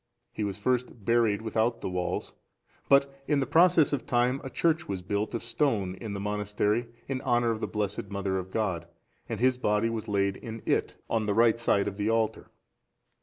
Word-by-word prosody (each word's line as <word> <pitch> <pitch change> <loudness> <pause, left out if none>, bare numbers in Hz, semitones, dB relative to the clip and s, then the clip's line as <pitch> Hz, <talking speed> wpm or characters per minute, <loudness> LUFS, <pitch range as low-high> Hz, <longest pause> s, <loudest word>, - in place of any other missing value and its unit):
He 110 - -3
was 100 -1 -2
first 120 -1 -1
buried 115 -3 +2
without 115 +1 0
the - - -3
walls; 90 -1 -2 0.6
but 140 0 +5
in 145 -2 +2
the 135 - +1
process 170 -2 +5
of 140 - -2
time 125 +2 +2
a 135 - -5
church 165 +3 0
was 95 -2 -3
built 100 +4 -2
of 115 - -3
stone 115 -7 0
in 110 -3 -5
the 100 - -4
monastery, 105 +2 0 0.2
in 130 -1 -2
honour 120 -2 +2
of 110 - -2
the - - -2
Blessed 105 -1 -3
Mother 100 -1 -1
of 95 0 -7
God, 95 -5 -2 0.4
and - - -3
his 130 +1 +3
body 105 -1 +1
was 110 -2 -4
laid 100 -1 +1
in 115 -1 -8
it, - - 0
on 110 -2 0
the 100 - +1
right 115 0 +4
side 100 -4 +2
of 100 -1 -4
the 105 +1 0
altar. 110 -1 0
110 Hz, 200 wpm, -28 LUFS, 100-120 Hz, 0.6 s, but